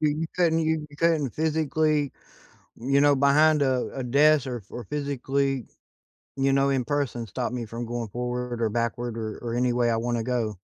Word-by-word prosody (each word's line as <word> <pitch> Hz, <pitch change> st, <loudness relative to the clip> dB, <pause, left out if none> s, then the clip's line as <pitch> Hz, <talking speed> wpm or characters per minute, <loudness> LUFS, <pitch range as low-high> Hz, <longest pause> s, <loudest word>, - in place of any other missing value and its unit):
you 155 Hz, +1 st, 0 dB
couldn't 170 Hz, -3 st, +3 dB
hear 160 Hz, 0 st, +1 dB
you 145 Hz, -, -15 dB
couldn't 160 Hz, -4 st, +2 dB
physically, 155 Hz, -2 st, +1 dB, 0.6 s
you 140 Hz, +3 st, +1 dB
know, 145 Hz, -1 st, +5 dB
behind 150 Hz, +3 st, +4 dB
a 130 Hz, -2 st, +1 dB
a 135 Hz, -, -4 dB
desk, 140 Hz, +2 st, +4 dB
or 125 Hz, -2 st, -3 dB
f 105 Hz, -, -13 dB
or 120 Hz, -, -7 dB
physically, 140 Hz, -1 st, -1 dB, 0.7 s
you 135 Hz, 0 st, +2 dB
know, 140 Hz, 0 st, +3 dB
in 135 Hz, -3 st, 0 dB
person, 135 Hz, -5 st, -2 dB
stop 125 Hz, +4 st, -3 dB
me 120 Hz, -2 st, -4 dB
from 115 Hz, +2 st, -6 dB
going 115 Hz, -2 st, -4 dB
forward, 125 Hz, +1 st, -3 dB
or 115 Hz, -, +2 dB
backward, 115 Hz, +1 st, -2 dB
or 110 Hz, -1 st, -4 dB
or 115 Hz, -1 st, -3 dB
any 125 Hz, 0 st, +1 dB
way 120 Hz, -1 st, +2 dB
I 115 Hz, -, +1 dB
wanna 120 Hz, 0 st, -1 dB
go. 115 Hz, -4 st, -2 dB
130 Hz, 190 wpm, -26 LUFS, 120-145 Hz, 0.7 s, know